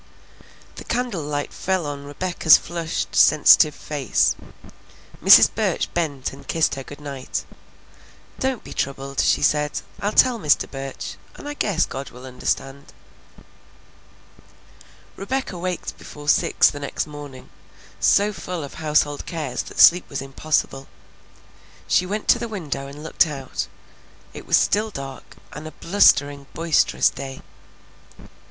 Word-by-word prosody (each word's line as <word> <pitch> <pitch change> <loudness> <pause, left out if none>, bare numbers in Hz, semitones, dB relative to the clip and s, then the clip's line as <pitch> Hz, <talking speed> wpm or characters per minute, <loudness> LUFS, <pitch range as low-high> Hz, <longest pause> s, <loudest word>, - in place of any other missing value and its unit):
The - - -7
candle 240 -7 -2
light 145 0 -4
fell 185 -3 -1
on 140 -1 -6
Rebecca's 160 +2 +4
flushed, 170 -1 -4
sensitive 150 0 +6
face. 145 -4 0 0.9
Mrs. - - +8
Burch - - -1
bent 145 -6 -2
and - - -14
kissed 160 -1 +1
her 135 - -5
good 145 +2 -11
night. 140 -3 -5 0.9
"Don't 265 -3 -1
be - - -9
troubled," 135 0 -4
she - - +2
said. 150 0 +1 0.2
"I'll 205 - -1
tell 245 +1 +4
Mr. 150 -6 +2
Burch, 135 -1 -6 0.2
and - - -10
I 290 - -4
guess 200 - 0
God 135 0 -7
will 125 +1 -12
understand." 135 +2 -4 2.2
Rebecca 260 +1 -3
waked 180 0 -4
before 145 0 -11
six - - +4
the 145 - -8
next 140 - -3
morning, 145 -3 -11 0.5
so 205 +1 +3
full 175 -2 -5
of 140 - -8
household 150 -1 +1
cares 155 -7 -3
that - - -10
sleep 175 +1 +7
was 140 - -4
impossible. 135 0 -2 1.0
She 180 - +2
went 210 +2 -4
to 240 - +5
the 235 - -4
window 150 -10 -5
and 145 +2 -10
looked 160 - +2
out; 135 -4 -5 0.7
it - - -10
was - - +5
still 215 +2 +1
dark, 135 -7 -9 0.2
and 155 +2 -8
a - - -8
blustering, 145 -7 +3
boisterous 165 -1 +2
day. 135 -1 -8
150 Hz, 135 wpm, -22 LUFS, 140-180 Hz, 2.2 s, Mrs